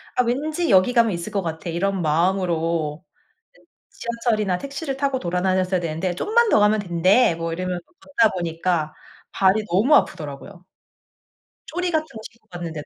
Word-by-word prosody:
'아 250 - +3
왠지 305 +8 -1
여기 195 +4 +4
가면 230 -2 +4
있을 170 -2 -5
것 200 - 0
같아.' 165 0 -5
이런 190 +3 -1
마음으로 165 -1 0 0.6
예 - - -26 0.3
지하철이나 225 -5 -1
택시를 280 0 -5
타고 275 -1 0
돌아다녔어야 185 0 0
되는데 170 +2 -2
'좀만 455 - +2
더 - - +4
가면 210 +1 +3
된대.' 180 +2 +3
뭐 165 0 -4
이러면서 180 0 -4 0.2
걷다 230 - +2
보니까 165 -2 -1 0.4
발이 195 +3 +2
너무 220 - +4
아프더라고요. 170 +3 -2 1.1
조리 360 0 -1
같은 315 -1 0
거 225 - -11
신고 230 - -30
갔는데도 170 -4 -7
185 Hz, 355 characters per minute, -22 LUFS, 170-235 Hz, 1.1 s, 여기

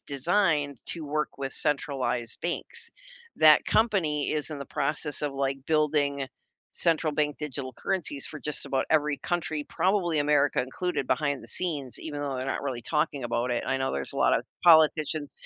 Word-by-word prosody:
designed 145 - +1
to 165 -2 -5
work 150 0 -2
with 135 -1 -3
centralized 135 -5 -1
banks. 460 - -4 0.5
That 155 -1 +7
company 185 -10 +1
is 155 0 -2
in 150 - -5
the 140 - -5
process 145 +1 -2
of, 145 -2 -2
like, 135 0 -1
building 145 -3 +1 0.5
central 165 -2 +1
bank 150 0 0
digital 140 -3 -5
currencies 160 -6 -2
for 155 - -8
just 150 -1 -4
about 135 -1 0
every 150 -2 +2
country, 160 -4 -2
probably 185 -4 +1
America 145 -1 +3
included 135 +3 -2
behind 140 +1 0
the - - -11
scenes, 145 -1 +1
even 145 -2 -5
though 140 -2 -2
they're 130 - -3
not - - -2
really 130 -4 -3
talking 150 +1 -1
about 120 +1 -1
it. 120 - -1
I 135 - +1
know 135 0 -1
there's 70 -1 -4
a - - -8
lot - - +4
of - - -4 0.2
politicians 155 -2 +4
150 Hz, 175 wpm, -27 LUFS, 135-155 Hz, 0.5 s, That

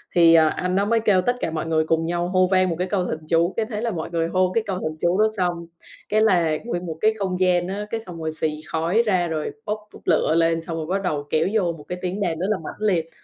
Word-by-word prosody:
thì 170 -1 +7
anh 165 +3 +3
đó 200 +1 +2
mới 230 +2 +2
kêu 205 -4 +3
tất 245 +7 +1
cả 165 - -2
mọi 160 0 -3
người 160 -1 +1
cùng 165 0 +1
nhau 175 +1 -1
hô 185 0 +3
vang 185 -1 +3
một 170 - -1
cái 180 - 0
câu 185 -2 0
thần 155 - -3
chú, 170 +2 +2
cái 225 - +1
thế 215 -2 -5
là 235 -1 -1
mọi 165 -5 -4
người 165 -1 0
hô 185 +1 +1
cái 230 - +2
câu 195 - -1
thần 155 -2 -3
chú 175 +3 +1
đó - - +6
xong, 175 -2 -1 0.4
cái 215 +1 +3
là 175 -7 +3
nguyên 180 -7 -3
một 160 -2 -5
cái 220 +1 +4
không 185 -2 -2
gian 180 -1 +2
á, 200 +2 -4
cái 225 - -2
xong 180 -7 -9
rồi 160 0 -2
xì 155 -1 -2
khói 170 +8 +1
ra 185 -5 +2
rồi 155 -2 -3
bốc 210 0 -1 0.2
bốc - - -13
lửa 160 -1 +2
lên 165 0 +2
xong 165 0 -5
rồi 160 - -3
bắt 190 +4 -1
đầu 145 -5 -2
kéo 155 +3 +2
vô 190 -6 +2
một 150 - -12
cái 180 - -4
tiếng 185 +2 -3
đàn 170 -5 -1
rất 185 - -1
là 215 - +1
mãnh - - -7 0.2
liệt. 165 -1 -2
175 Hz, 285 wpm, -23 LUFS, 165-195 Hz, 0.4 s, thì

